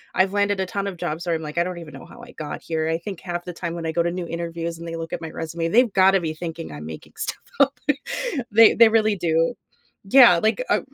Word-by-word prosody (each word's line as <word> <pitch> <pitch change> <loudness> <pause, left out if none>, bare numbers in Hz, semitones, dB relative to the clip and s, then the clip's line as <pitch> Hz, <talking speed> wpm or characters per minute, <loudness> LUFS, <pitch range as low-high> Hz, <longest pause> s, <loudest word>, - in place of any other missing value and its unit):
I've 190 +1 +2
landed 205 -1 +1
a - - 0
ton 200 +2 -3
of 195 - -4
jobs 165 +1 -4
where 170 -2 0
I'm 160 - -4
like, 150 0 -7
"I 170 - +4
don't 180 -1 -5
even 160 -3 -11
know - - -11
how 235 - -14
I 240 +1 -12
got 155 -2 -6
here." 160 -1 -2
I 165 +1 0
think 190 0 -7
half 175 -1 -4
the 180 - -7
time 170 0 -5
when 170 -1 -5
I - - -1
go 170 +1 +1
to 170 - 0
new 180 -1 -4
interviews, 170 0 -4
and 170 0 -8
they 165 - -5
look 165 -1 -6
at - - -4
my 160 -1 -6
resume, 165 +1 -3
they've 235 +6 +4
gotta 190 0 +5
be 160 -2 -3
thinking 160 - -6
I'm 75 +1 -8
making 80 0 -10
stuff - - -4 0.2
up. 280 0 +3 0.7
They 225 +1 +7
they 230 -1 +8
really 215 -1 +2
do. 165 +4 +1 0.5
Yeah, 215 -5 +7
like, 220 - +1
uh, - - +3
170 Hz, 270 wpm, -23 LUFS, 165-200 Hz, 0.7 s, they